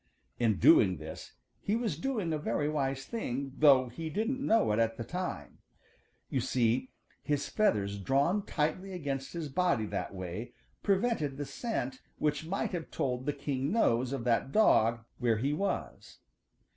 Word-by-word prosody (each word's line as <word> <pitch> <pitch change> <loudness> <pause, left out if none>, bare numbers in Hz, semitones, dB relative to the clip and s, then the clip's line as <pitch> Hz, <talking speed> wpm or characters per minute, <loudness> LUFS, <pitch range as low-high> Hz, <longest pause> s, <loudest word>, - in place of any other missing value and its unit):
In 115 -3 +2
doing 330 +2 +6
this - - -9 0.3
he 210 - 0
was 225 -8 -1
doing 200 - -2
a 155 - -1
very 145 0 -1
wise 135 -3 -1
thing, 140 - -3
though 135 -4 +6
he 160 +7 -6
didn't 230 - -1
know 220 - +3
it 105 - +1
at 115 0 +1
the 115 - -3
time. 175 - -5 0.7
You 130 - -1
see 125 0 +1 0.3
his 145 -2 -1
feathers 100 - +1
drawn 140 - +2
tightly 180 +5 -2
against 140 -6 -4
his 165 -3 -3
body 140 -6 +1
that - - -3
way 95 +7 -6 0.3
prevented 195 - +1
the 145 - -3
scent 135 - -3 0.2
which 150 +1 -1
might 195 +4 -1
have 170 -4 -4
told 125 0 -2
the 145 - +1
keen 140 0 -2
nose 125 - +2
of 135 -4 -3
that 120 +2 +1
dog 115 - +4
where 120 -3 +2
he 135 +6 0
was. 195 +6 -3
140 Hz, 160 wpm, -31 LUFS, 125-180 Hz, 0.7 s, doing